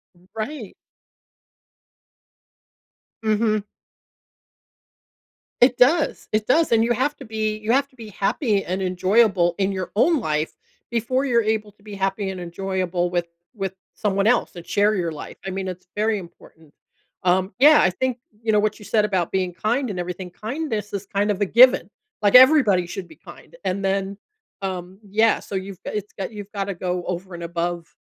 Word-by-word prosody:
R 175 Hz, -, -24 dB
Right. 220 Hz, -1 st, -5 dB, 2.5 s
Mhm. 215 Hz, -1 st, +1 dB, 2.0 s
It 245 Hz, 0 st, +5 dB
does. 300 Hz, +5 st, +3 dB
It 215 Hz, 0 st, 0 dB
does, 315 Hz, +1 st, +3 dB
and 225 Hz, 0 st, +4 dB
you 240 Hz, +1 st, +2 dB
have 285 Hz, +4 st, 0 dB
to 270 Hz, -, -10 dB
be 215 Hz, -1 st, -2 dB
you 215 Hz, +2 st, -2 dB
have 275 Hz, +1 st, +2 dB
to 260 Hz, -, -27 dB
be 225 Hz, -3 st, -10 dB
happy 205 Hz, -, 0 dB
and 185 Hz, +2 st, -3 dB
enjoyable 185 Hz, -1 st, +2 dB
in 195 Hz, 0 st, +1 dB
your 185 Hz, -1 st, -4 dB
own 315 Hz, +6 st, +4 dB
life 155 Hz, -5 st, -1 dB, 0.4 s
before 240 Hz, +4 st, 0 dB
you're 235 Hz, -4 st, +3 dB
able 215 Hz, -1 st, -1 dB
to 205 Hz, -, -28 dB
be 210 Hz, -2 st, -9 dB
happy 195 Hz, +1 st, -1 dB
and 190 Hz, -1 st, -5 dB
enjoyable 180 Hz, 0 st, -2 dB
with 175 Hz, -1 st, -1 dB, 0.3 s
with 195 Hz, -4 st, -4 dB, 0.2 s
someone 200 Hz, -2 st, 0 dB
else 235 Hz, -5 st, +2 dB
and 170 Hz, -, -9 dB
share 205 Hz, +4 st, +2 dB
your 170 Hz, -3 st, -1 dB
life. 150 Hz, -, -8 dB
I -, -, -2 dB
mean, 190 Hz, 0 st, -4 dB
it's 180 Hz, 0 st, -7 dB
very 215 Hz, 0 st, +1 dB
important. 165 Hz, -4 st, -14 dB, 0.5 s
Um, 185 Hz, +2 st, +2 dB
yeah, 295 Hz, +2 st, +8 dB
I 190 Hz, -, +4 dB
think, 250 Hz, +7 st, -2 dB, 0.2 s
you 225 Hz, -1 st, 0 dB
know, 210 Hz, -, +5 dB
what 210 Hz, 0 st, 0 dB
you 210 Hz, -, -12 dB
said 215 Hz, -2 st, +2 dB
about 190 Hz, -5 st, 0 dB
being 185 Hz, -2 st, 0 dB
kind 240 Hz, +7 st, -1 dB
and 185 Hz, -3 st, -4 dB
everything- 180 Hz, +1 st, -5 dB
kindness 220 Hz, -, -4 dB
is 200 Hz, 0 st, -3 dB
kind 200 Hz, +1 st, 0 dB
of 205 Hz, -, -3 dB
a 205 Hz, -, +4 dB
given. 250 Hz, +6 st, +6 dB, 0.3 s
Like, 205 Hz, +3 st, +3 dB
everybody 250 Hz, -, +7 dB
should 185 Hz, +1 st, -6 dB
be 320 Hz, -, -15 dB
kind. -, -, -14 dB
And 195 Hz, +2 st, -1 dB
then, 195 Hz, 0 st, -1 dB, 0.4 s
um 185 Hz, 0 st, -5 dB
yeah, 220 Hz, +3 st, +3 dB
so 195 Hz, -, -7 dB
you've 190 Hz, -1 st, -5 dB
go -, -, -5 dB
it's 210 Hz, -1 st, -5 dB
go 195 Hz, -, -2 dB
you've 205 Hz, -1 st, -9 dB
gotta 200 Hz, -1 st, -2 dB
go 180 Hz, 0 st, -2 dB
over 180 Hz, +1 st, -5 dB
and 170 Hz, 0 st, -7 dB
above, 170 Hz, 0 st, -3 dB
200 Hz, 180 wpm, -23 LUFS, 185-225 Hz, 2.5 s, yeah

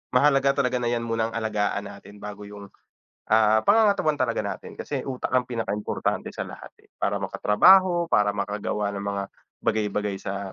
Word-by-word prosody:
mahalaga 140 Hz, +1 st, +4 dB
talaga 125 Hz, 0 st, 0 dB
na 120 Hz, -, -1 dB
'yan 120 Hz, -1 st, -1 dB
muna 115 Hz, -1 st, 0 dB
alagaan 105 Hz, -3 st, -1 dB
natin 100 Hz, 0 st, -12 dB
bago 105 Hz, 0 st, -8 dB
'yung, 100 Hz, -1 st, -11 dB, 0.6 s
ah, 110 Hz, 0 st, +4 dB
pangangatawan 200 Hz, -8 st, +4 dB
talaga 120 Hz, -2 st, +1 dB
natin. 100 Hz, -, -6 dB
Kasi 140 Hz, -2 st, -3 dB
utak 130 Hz, -1 st, -4 dB
ang 125 Hz, -1 st, +1 dB
pinakaimportante 115 Hz, -3 st, -2 dB
sa -, -, -4 dB
lahat, -, -, -10 dB, 0.2 s
eh, -, -, -26 dB
para -, -, 0 dB
makatrabaho, 175 Hz, -, +4 dB
para 105 Hz, 0 st, +4 dB
makagawa 105 Hz, 0 st, -2 dB
ng 100 Hz, -, -4 dB
mga 100 Hz, 0 st, -2 dB, 0.4 s
bagay-bagay 105 Hz, -2 st, 0 dB
sa 100 Hz, -1 st, -5 dB
110 Hz, 160 wpm, -25 LUFS, 105-130 Hz, 0.6 s, mahalaga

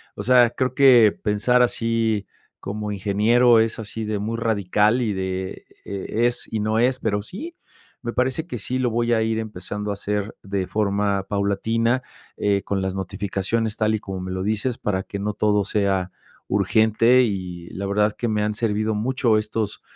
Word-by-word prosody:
O -, -, -5 dB
sea, 125 Hz, -2 st, +5 dB
creo 130 Hz, +1 st, -1 dB
que 125 Hz, -6 st, +6 dB
pensar 115 Hz, +4 st, +2 dB
así 115 Hz, -3 st, 0 dB, 0.4 s
como 105 Hz, +1 st, -4 dB
ingeniero 110 Hz, +5 st, +4 dB
es 110 Hz, 0 st, 0 dB
así 110 Hz, 0 st, -5 dB
de 105 Hz, -1 st, -2 dB
muy 110 Hz, +3 st, -3 dB
radical, 105 Hz, +1 st, +2 dB
y 110 Hz, -4 st, 0 dB
de 95 Hz, 0 st, -4 dB, 0.2 s
es 115 Hz, +5 st, -1 dB
y 110 Hz, -2 st, -2 dB
no 110 Hz, +1 st, +1 dB
es, 125 Hz, +2 st, +2 dB
pero 105 Hz, -2 st, 0 dB
sí, 325 Hz, -, -8 dB, 0.4 s
me 120 Hz, -1 st, -3 dB
parece 130 Hz, +6 st, 0 dB
que 120 Hz, -, -5 dB
sí 125 Hz, +5 st, -2 dB
lo 125 Hz, -1 st, +1 dB
voy 120 Hz, +1 st, +1 dB
a 110 Hz, -, +2 dB
ir 110 Hz, 0 st, 0 dB
empezando 105 Hz, -1 st, -5 dB
a -, -, 0 dB
hacer 105 Hz, +1 st, -3 dB
de 100 Hz, -2 st, -2 dB
forma 100 Hz, -2 st, 0 dB
paulatina, 115 Hz, +5 st, 0 dB, 0.3 s
eh, 100 Hz, -1 st, +1 dB
con 100 Hz, -1 st, -2 dB
las 95 Hz, 0 st, -2 dB
notificaciones, 100 Hz, +3 st, -2 dB
tal 110 Hz, 0 st, +2 dB
y 110 Hz, -, -2 dB
como 95 Hz, -2 st, -6 dB
me 95 Hz, -, -5 dB
lo 95 Hz, 0 st, -3 dB
dices, 110 Hz, +4 st, -1 dB
para 95 Hz, -2 st, -2 dB
que 100 Hz, -, -6 dB
no 105 Hz, +1 st, -2 dB
todo 105 Hz, -1 st, +1 dB
sea 95 Hz, -3 st, 0 dB, 0.4 s
urgente, 110 Hz, +5 st, +3 dB
y 90 Hz, -5 st, -4 dB
la 100 Hz, +1 st, -5 dB
verdad 105 Hz, +1 st, +1 dB
que 120 Hz, -, -1 dB
me 105 Hz, -1 st, 0 dB
han 105 Hz, 0 st, 0 dB
servido 110 Hz, -1 st, 0 dB
mucho 115 Hz, 0 st, +1 dB
estos 105 Hz, -1 st, -3 dB
105 Hz, 180 wpm, -23 LUFS, 100-115 Hz, 0.4 s, que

